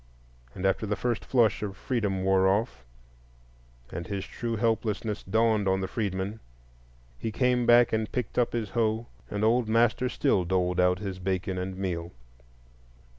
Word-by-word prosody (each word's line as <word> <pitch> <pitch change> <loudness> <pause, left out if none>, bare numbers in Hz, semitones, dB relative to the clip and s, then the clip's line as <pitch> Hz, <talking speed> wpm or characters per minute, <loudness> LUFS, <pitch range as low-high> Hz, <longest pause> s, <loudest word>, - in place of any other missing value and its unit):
And 95 - -4
after 95 +3 +1
the 105 - 0
first 120 -2 -2
flush 120 -4 +2
of 100 -2 -4
freedom 100 -7 -1
wore 95 0 +4
off, 95 - 0 1.1
and 85 +1 -5
his 100 -1 -3
true 115 -1 -4
helplessness 110 -1 -1
dawned 110 0 +2
on 95 0 +2
the 95 - -2
freedman, 100 0 -3 0.8
he 110 - -3
came 125 +1 +1
back 120 -1 +6
and 110 -1 0
picked 125 -1 -2
up 120 - +2
his 110 -4 -2
hoe, 110 +1 0 0.2
and 105 - -2
old 115 +1 +3
master 120 +2 +2
still 115 -10 +1
doled 90 0 0
out 90 0 +4
his 95 -2 -5
bacon 95 0 -2
and 95 0 -4
meal. 85 -3 -3
105 Hz, 160 wpm, -28 LUFS, 95-115 Hz, 1.1 s, back